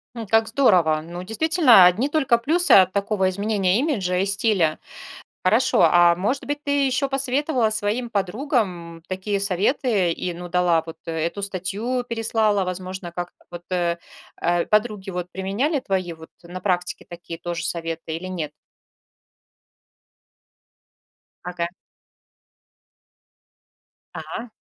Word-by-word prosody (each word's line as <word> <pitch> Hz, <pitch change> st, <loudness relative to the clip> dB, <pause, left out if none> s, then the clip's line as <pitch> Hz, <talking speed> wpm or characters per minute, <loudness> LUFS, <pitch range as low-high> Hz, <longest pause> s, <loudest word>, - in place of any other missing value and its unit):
М, 230 Hz, -2 st, -6 dB
как 225 Hz, +2 st, +3 dB
здорово. 180 Hz, -, +3 dB
Ну, 175 Hz, +3 st, -8 dB
действительно, 240 Hz, -, +5 dB
одни 220 Hz, +11 st, +3 dB
только 270 Hz, -6 st, +2 dB
плюсы 335 Hz, +9 st, +1 dB
от 185 Hz, -2 st, +7 dB
такого 200 Hz, -1 st, 0 dB
изменения 200 Hz, 0 st, 0 dB
имиджа 205 Hz, -, 0 dB
и 190 Hz, -, +1 dB
стиля. 195 Hz, -5 st, +1 dB, 0.6 s
Хорошо, 215 Hz, 0 st, +3 dB
а 170 Hz, +1 st, +5 dB
может 215 Hz, +10 st, -1 dB
быть, 290 Hz, 0 st, -4 dB
ты 285 Hz, -1 st, +1 dB
ещё 260 Hz, +2 st, 0 dB
посоветовала 270 Hz, -2 st, 0 dB
своим 220 Hz, +3 st, -1 dB
подругам 195 Hz, -, -2 dB
такие 190 Hz, +2 st, -2 dB
советы 200 Hz, 0 st, +1 dB
и, 180 Hz, +1 st, -3 dB
ну, 175 Hz, +1 st, -8 dB
дала 175 Hz, -2 st, +2 dB
вот 165 Hz, -, -9 dB
эту 165 Hz, +4 st, -3 dB
статью, 200 Hz, +6 st, -3 dB
переслала? 220 Hz, -3 st, 0 dB
Возможно, 185 Hz, -1 st, -5 dB
как-то 175 Hz, +1 st, -7 dB
вот, 175 Hz, 0 st, -8 dB
э, 170 Hz, -1 st, 0 dB, 0.7 s
подруги 210 Hz, -3 st, +1 dB
вот 180 Hz, 0 st, -5 dB
применяли 210 Hz, -, -1 dB
твои 190 Hz, -7 st, -2 dB
вот 160 Hz, 0 st, -13 dB
на 175 Hz, +2 st, -8 dB
практике 180 Hz, -2 st, -2 dB
такие 170 Hz, -1 st, -9 dB
тоже 175 Hz, -1 st, -4 dB
советы 165 Hz, -1 st, -4 dB
или 170 Hz, +3 st, -6 dB
нет? 165 Hz, -5 st, -4 dB, 2.9 s
Ага. 175 Hz, -1 st, -3 dB, 2.5 s
А. 230 Hz, 0 st, -7 dB
190 Hz, 120 wpm, -23 LUFS, 175-230 Hz, 2.9 s, от